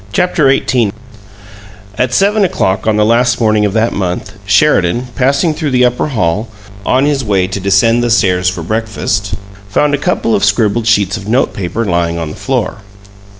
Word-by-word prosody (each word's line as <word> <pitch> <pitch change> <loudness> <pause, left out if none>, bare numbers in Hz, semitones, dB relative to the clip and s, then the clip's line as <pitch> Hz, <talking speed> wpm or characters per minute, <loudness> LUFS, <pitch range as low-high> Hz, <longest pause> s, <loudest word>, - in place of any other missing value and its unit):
CHAPTER 155 - +2
XVIII 120 -5 +1 1.0
At 125 +1 0
seven 200 - +2
o'clock 110 - -1
on 110 - +2
the 105 0 +2
last 120 +2 +2
morning 110 -2 +2
of 100 - -1
that 115 +1 +1
month, 95 +2 -3
Sheridan, 100 - +2
passing 140 +6 +1
through 155 -1 -3
the 125 -1 +3
upper 125 +4 0
hall 105 - -1 0.4
on 130 +5 +2
his 145 -2 0
way 100 -4 +1
to 95 - -4
descend 100 +5 +2
the 120 - 0
stairs 95 -5 +2
for 90 -3 -5
breakfast, 105 0 -2 0.3
found 145 +8 +1
a 140 - 0
couple 140 -9 -1
of - - +1
scribbled 105 +2 +1
sheets 100 -4 +2
of 100 - -9
note 125 +5 +1
paper 100 +5 -3
lying 85 -3 -1
on 80 -2 -4
the - - -9
floor. 130 -6 -2
110 Hz, 180 wpm, -13 LUFS, 100-125 Hz, 1.0 s, the